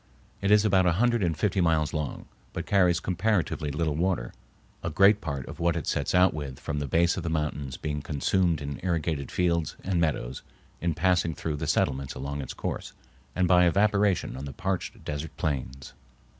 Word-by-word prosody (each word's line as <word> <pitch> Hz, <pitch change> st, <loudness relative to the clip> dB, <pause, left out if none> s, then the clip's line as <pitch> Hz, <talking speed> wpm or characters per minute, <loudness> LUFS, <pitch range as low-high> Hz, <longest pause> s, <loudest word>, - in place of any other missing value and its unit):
It 100 Hz, -, +1 dB
is 105 Hz, 0 st, +5 dB
about 95 Hz, -3 st, +4 dB
a 85 Hz, -, +4 dB
hundred 120 Hz, +4 st, +2 dB
and 85 Hz, -4 st, 0 dB
fifty 100 Hz, -3 st, +1 dB
miles 80 Hz, -3 st, +2 dB
long, 75 Hz, -3 st, -3 dB, 0.3 s
but -, -, -4 dB
carries 90 Hz, -4 st, +3 dB
comparatively 90 Hz, -4 st, 0 dB
little 75 Hz, +2 st, -1 dB
water, 85 Hz, -7 st, -1 dB, 0.5 s
a -, -, -2 dB
great 100 Hz, +6 st, +5 dB
part 70 Hz, -7 st, -4 dB
of -, -, -9 dB
what 85 Hz, 0 st, +2 dB
it 80 Hz, -, -3 dB
sets -, -, -1 dB
out 90 Hz, +1 st, +5 dB
with 70 Hz, -4 st, -6 dB
from 75 Hz, -, -3 dB
the 75 Hz, -, -3 dB
base 85 Hz, +5 st, +2 dB
of -, -, -2 dB
the 85 Hz, -, -3 dB
mountains 75 Hz, -4 st, -2 dB
being 75 Hz, -1 st, -3 dB
consumed 80 Hz, +3 st, +1 dB
in 70 Hz, 0 st, -5 dB
irrigated 80 Hz, -5 st, -1 dB
fields 85 Hz, -3 st, 0 dB
and 90 Hz, -2 st, 0 dB
meadows 65 Hz, -6 st, -1 dB, 0.4 s
in 85 Hz, -2 st, 0 dB
passing 85 Hz, -2 st, +2 dB
through 75 Hz, -2 st, -3 dB
the -, -, -3 dB
settlements 65 Hz, 0 st, 0 dB
along 70 Hz, +1 st, -4 dB
its 65 Hz, -, -7 dB
course, -, -, -4 dB, 0.4 s
and 90 Hz, 0 st, +2 dB
by 90 Hz, -1 st, +5 dB
evaporation 100 Hz, 0 st, +2 dB
on 65 Hz, +2 st, -6 dB
the 70 Hz, -, -7 dB
parched 95 Hz, -2 st, -3 dB
desert 75 Hz, +1 st, -5 dB
plains. 65 Hz, -3 st, -3 dB
85 Hz, 190 wpm, -27 LUFS, 75-90 Hz, 0.5 s, is